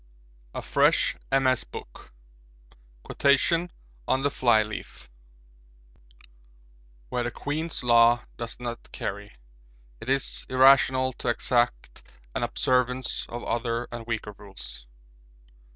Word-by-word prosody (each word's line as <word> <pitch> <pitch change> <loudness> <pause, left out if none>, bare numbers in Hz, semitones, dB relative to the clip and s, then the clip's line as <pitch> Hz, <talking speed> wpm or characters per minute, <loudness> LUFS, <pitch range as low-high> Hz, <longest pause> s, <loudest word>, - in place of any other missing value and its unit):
A - - -4
FRESH - - +3 0.2
MS. 130 -2 +3
BOOK - - -11 0.9
Quotations 165 +5 +2 0.4
on 130 - +1
the 145 - +2
Flyleaf 110 - 0 2.0
'Where 125 - -1
the 120 - -1
(Queen's) 155 +4 -4
Law 120 0 +5
does 115 0 -6
not 120 -1 -7
carry 100 +1 -6 0.6
it - - -8
is 135 0 0
irrational 130 0 +5
to - - -7
exact 120 0 0 0.3
an - - -2
observance 125 0 +1
of 120 +1 -6
other 120 0 -2
and 120 -1 -7
weaker 110 -2 -3
rules.' 65 -12 -9
120 Hz, 105 wpm, -26 LUFS, 115-130 Hz, 2.0 s, Law